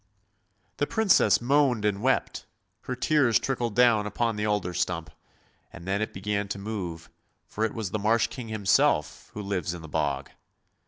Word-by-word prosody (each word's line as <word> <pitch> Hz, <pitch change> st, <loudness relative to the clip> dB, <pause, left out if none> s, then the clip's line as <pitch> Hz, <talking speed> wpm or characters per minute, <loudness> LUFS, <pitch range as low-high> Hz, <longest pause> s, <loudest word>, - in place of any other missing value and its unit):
" -, -, -44 dB
The -, -, 0 dB
Princess 220 Hz, -4 st, +4 dB
moaned 130 Hz, -4 st, +2 dB
and 100 Hz, -1 st, 0 dB
wept! 130 Hz, +2 st, 0 dB, 0.4 s
Her 125 Hz, -, -3 dB
tears 130 Hz, -3 st, +3 dB
trickled 120 Hz, -5 st, -2 dB
down 115 Hz, -4 st, +4 dB
upon 115 Hz, +1 st, -1 dB
the 105 Hz, 0 st, -1 dB
alder 105 Hz, -4 st, -1 dB
stump, 85 Hz, -3 st, -2 dB, 0.6 s
and 85 Hz, -, -11 dB
then 100 Hz, +2 st, -1 dB
it 110 Hz, -, -2 dB
began 100 Hz, +1 st, -2 dB
to 100 Hz, -, -4 dB
move, 95 Hz, -6 st, -6 dB, 0.3 s
for 110 Hz, -, -4 dB
it 110 Hz, -, -4 dB
was 110 Hz, -6 st, -4 dB
the 110 Hz, -, -2 dB
Marsh 110 Hz, +3 st, +2 dB
King 115 Hz, +1 st, -7 dB
himself, 110 Hz, -, +1 dB
who 105 Hz, -, -5 dB
lives 90 Hz, -4 st, -2 dB
in 85 Hz, -, -10 dB
the -, -, -8 dB
bog. 70 Hz, -3 st, -2 dB
105 Hz, 175 wpm, -27 LUFS, 95-120 Hz, 0.6 s, Princess